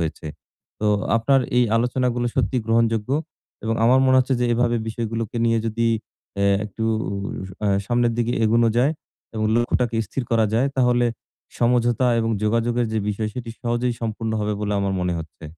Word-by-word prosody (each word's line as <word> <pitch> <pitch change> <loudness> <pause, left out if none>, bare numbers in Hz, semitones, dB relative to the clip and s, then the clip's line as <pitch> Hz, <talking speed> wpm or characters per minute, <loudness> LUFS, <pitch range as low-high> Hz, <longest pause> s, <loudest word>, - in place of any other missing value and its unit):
হয়েছে। 80 -1 -4 0.5
তো 105 - 0 0.3
আপনার 135 +4 +3 0.2
এই 125 - +5
আলোচনাগুলো 120 0 0
সত্যিই 125 -1 0
গ্রহণযোগ্য 115 0 +1 0.5
এবং 115 0 0
আমার 130 +3 +5
মনে 130 - +5
হচ্ছে 130 +1 +2
যে - - +2
এভাবে 120 0 +1
বিষয়গুলোকে 115 0 -4
নিয়ে 115 0 +2
যদি 115 +1 0 0.5
অ্যা 100 - +1 0.2
একটু 105 +2 -5 0.8
আ 105 - +2 0.2
সামনের 120 -1 +2
দিকে 120 0 +1
এগোনো 115 +1 +3
যায় 135 +6 +3 0.4
এবং 110 -1 -1
লক্ষ্যটাকে 120 0 +1
স্থির 130 - -3
করা 115 -1 +3
যায় 125 +4 +3
তাহলে 125 -1 +3 0.5
সমঝোতা 120 +1 +2
এবং 115 0 0
যোগাযোগের 115 +2 +1
যে 110 - 0
বিষয় 105 +1 -2
সেটি 120 -2 -5
সহজেই 120 0 -1
সম্পূর্ণ 110 0 -3
হবে 105 0 -1
বলে 105 -1 -1
আমার 100 -1 -1
মনে 90 0 0
হচ্ছে। 80 0 -11
115 Hz, 160 wpm, -22 LUFS, 110-120 Hz, 0.8 s, এই